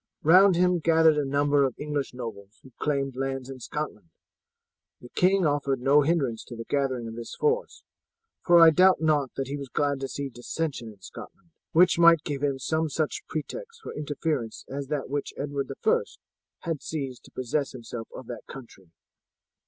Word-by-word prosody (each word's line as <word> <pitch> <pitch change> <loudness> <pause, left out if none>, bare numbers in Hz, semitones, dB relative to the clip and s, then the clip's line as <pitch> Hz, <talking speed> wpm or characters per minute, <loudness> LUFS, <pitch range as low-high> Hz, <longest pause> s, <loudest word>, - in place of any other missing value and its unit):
Round 185 +4 +7
him 180 0 +3
gathered 160 -1 +4
a - - +1
number 145 +1 +2
of 130 -3 0
the - - -7
English 145 -2 -2
nobles 110 -4 -8
who 130 - -15
claimed 140 -3 -1
lands 135 0 -3
in 130 - -9
Scotland. 125 - -5 0.9
The 120 - -13
king 185 +4 +2
offered 140 -3 0
no 140 +4 +5
hindrance 140 -7 0
to 120 - -9
the 115 0 -7
gathering 130 -4 -1
of 115 - -7
this 120 0 -7
force, 455 +2 -1 0.6
for 175 -1 +6
I 165 -1 +9
doubt 185 +3 +5
not 150 -4 +2
that 135 - -2
he 140 +2 -4
was 140 -2 -7
glad 145 0 0
to 135 - -3
see 140 +1 -4
dissension 125 +1 -4
in 105 -3 -13
Scotland, 175 - -12 0.2
which 175 +1 +4
might 170 -2 +6
give 140 -2 -4
him 140 -2 0
some 160 +4 -1
such 155 +1 -2
pretext 465 - -6
for - - -7
interference 145 -5 -3
as 140 0 -5
that 145 -1 -2
which 145 +1 -4
Edward 140 -1 -3
I - - +4 0.6
had 165 -4 -3
seized 135 -5 -5
to - - -16
possess 130 +3 -2
himself 115 -2 -7
of 130 - -8
that 120 - -8
country. 115 -9 -12
140 Hz, 185 wpm, -27 LUFS, 130-160 Hz, 0.9 s, I